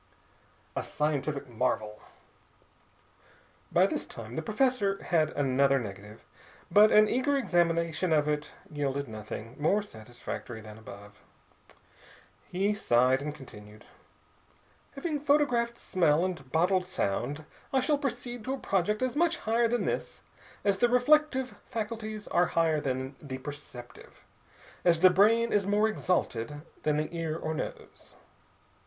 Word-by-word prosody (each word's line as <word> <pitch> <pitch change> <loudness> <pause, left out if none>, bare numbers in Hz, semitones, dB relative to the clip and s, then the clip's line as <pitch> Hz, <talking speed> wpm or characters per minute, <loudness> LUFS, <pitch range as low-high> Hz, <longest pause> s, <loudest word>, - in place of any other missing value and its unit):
A - - 0
SCIENTIFIC 145 -1 -2
MARVEL 110 -3 -2 1.7
By - - +5
this - - -2
time 115 +1 -9
the - - -1
professor 215 0 0
had 155 -3 +2
another 135 0 +3
negative, 105 -2 -8 0.5
but 210 +4 +7
an 215 0 +7
eager 270 +5 +1
examination 170 -5 +1
of 150 -1 +3
it 150 0 -2 0.2
yielded 140 -1 -2
nothing 110 +2 -7
more 195 +8 +2
satisfactory 120 - -8
than 110 -1 -11
before. 100 -1 -11 1.4
He 195 +3 0
sighed 130 -7 +3
and 150 +1 -4
continued: 105 -6 -13 1.1
"Having 295 +2 -3
photographed 250 -5 +2
smell 170 -5 +2
and 160 -8 -5
bottled 180 +3 +2
sound, 145 - -2 0.3
I 265 - +3
shall 285 +3 +1
proceed 245 -4 -4
to 265 +1 -1
a - - -8
project 210 0 0
as 255 +1 -1
much 340 +2 +2
higher 230 +2 +1
than 240 +1 0
this - - -3 0.4
as 200 -1 +1
the 240 - +4
reflective 265 +1 +3 0.2
faculties 215 -1 -4
are 175 0 +3
higher 160 -2 +3
than 130 0 -3
the 135 -3 -6
perceptive, 130 -3 -11 0.6
as 170 -2 +3
the 185 0 +8
brain 225 +5 +4
is 200 -2 +2
more 210 +2 +3
exalted 150 - -1 0.2
than 150 -1 +1
the 155 +3 -3
ear 165 -1 -2
or 160 -1 -3
nose. - - -7
165 Hz, 135 wpm, -29 LUFS, 135-220 Hz, 1.7 s, the